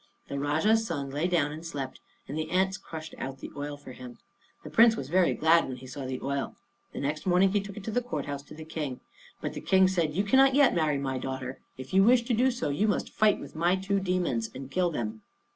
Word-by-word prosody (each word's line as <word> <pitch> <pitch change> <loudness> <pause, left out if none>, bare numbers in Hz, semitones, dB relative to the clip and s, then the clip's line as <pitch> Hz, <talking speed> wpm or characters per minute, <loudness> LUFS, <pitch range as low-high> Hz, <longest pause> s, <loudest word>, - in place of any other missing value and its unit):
The 140 - -3
Rajah's 160 +11 +2
son 140 -5 -3
lay 150 +5 0
down 165 -5 +1
and 155 +2 -8
slept, 140 -6 -5 0.3
and 140 - -5
the 155 0 -3
ants 190 +1 +2
crushed 160 -5 -8
out 135 0 -5
the - - -9
oil 145 0 -5
for 145 -2 -11
him. 125 -1 -10 0.5
The - - -9
Prince 230 0 +6
was 135 -10 -6
very 180 +2 +3
glad 165 +1 +4
when 130 - -5
he 130 - -11
saw 130 +1 -6
the 130 0 -3
oil. 140 0 -2 0.4
The - - -6
next 150 +5 -3
morning 185 +2 +4
he 205 0 +2
took 200 0 -9
it 210 - -7
to 220 - -4
the 245 - +1
court 155 - -4
house 140 -1 -4
to 150 - -12
the 160 0 -9
King. 150 -5 -4 0.4
But - - -3
the - - -6
King 190 -1 +4
said, 170 -5 0
"You 195 - +2
cannot 265 +5 +5
yet 280 -3 +5
marry 155 -4 +1
my 135 -1 -2
daughter. 130 0 -5 0.2
If 130 +4 -9
you 190 +1 +6
wish 240 +3 +5
to 240 0 -1
do 250 +4 +3
so, 245 - -2
you 170 +10 +1
must 210 - -1
fight 215 -1 +3
with - - -10
my 170 +3 +2
two 195 +1 0
demons, 180 -12 -1
and 135 +1 -8
kill 180 +2 +2
them." 110 -8 -4
160 Hz, 250 wpm, -28 LUFS, 140-195 Hz, 0.5 s, Prince